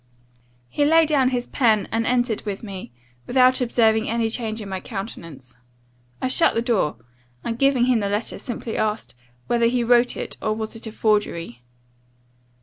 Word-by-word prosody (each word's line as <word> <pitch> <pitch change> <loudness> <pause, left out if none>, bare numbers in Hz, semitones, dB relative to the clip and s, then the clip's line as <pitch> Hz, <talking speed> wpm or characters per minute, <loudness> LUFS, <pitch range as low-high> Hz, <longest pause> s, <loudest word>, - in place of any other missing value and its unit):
"He 290 - 0
laid 320 +2 +5
down 270 -4 +3
his 245 -1 -2
pen, 220 -6 +2
and 225 0 0
entered 240 -3 +1
with 205 -1 -5
me, 195 - -8 0.4
without 255 0 +4
observing 225 -2 +2
any 230 -1 0
change 225 -2 -3
in 210 - -7
my 190 -1 -4
countenance. 165 - -8 0.7
I - - -1
shut 295 +6 +2
the 230 - +1
door, 220 - +1 0.5
and, 230 0 -4
giving 275 -3 +3
him 250 -2 +3
the 200 -1 -1
letter, 205 +3 -2
simply 240 -3 -5
asked, 215 0 -2 0.3
'whether 235 -1 +2
he 245 0 +1
wrote 240 +1 +3
it, - - -6
or 215 - 0
was 220 +1 -4
it 225 0 -7
a - - -6
forgery? 205 - -1
230 Hz, 170 wpm, -22 LUFS, 210-245 Hz, 0.7 s, laid